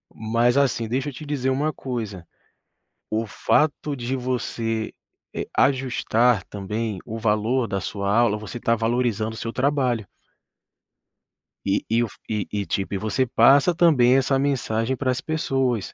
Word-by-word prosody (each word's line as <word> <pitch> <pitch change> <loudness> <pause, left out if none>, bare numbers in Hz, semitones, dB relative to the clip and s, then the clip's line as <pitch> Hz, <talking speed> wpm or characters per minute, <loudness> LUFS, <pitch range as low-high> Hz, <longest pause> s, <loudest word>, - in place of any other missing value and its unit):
Mas, 115 +3 +1
assim, 125 -5 +1
deixa 130 +5 -1
eu - - -9
te 140 +5 -9
dizer 140 -3 -1
uma 145 +4 +1
coisa: 110 -11 -5 0.8
o 110 +1 -1
fato 145 +6 +1
de 125 +1 -2
você, 115 -3 -2 0.4
eh, - - -3
ajustar 125 -4 +2
também 105 +1 -4
o 110 - -6
valor 110 +3 +1
da 100 -1 -2
sua 100 +1 -2
aula, 115 -2 +3
você 110 +3 -7
tá 115 - +2
valorizando 115 -1 0
o - - -9
seu 115 - -4
trabalho. 125 -6 0 1.6
E 100 0 0
e 115 +2 +3
o - - -1
f - - -16
e 105 -3 -2
e, 105 -1 -2
tipo, 95 +1 -2
e - - 0
você 110 +6 0
passa 135 +8 +5
também 135 -7 +5
essa 135 0 +2
mensagem 130 -3 0
para 130 0 0
as 125 - -2
pessoas. 135 - -1
120 Hz, 160 wpm, -23 LUFS, 110-130 Hz, 1.6 s, passa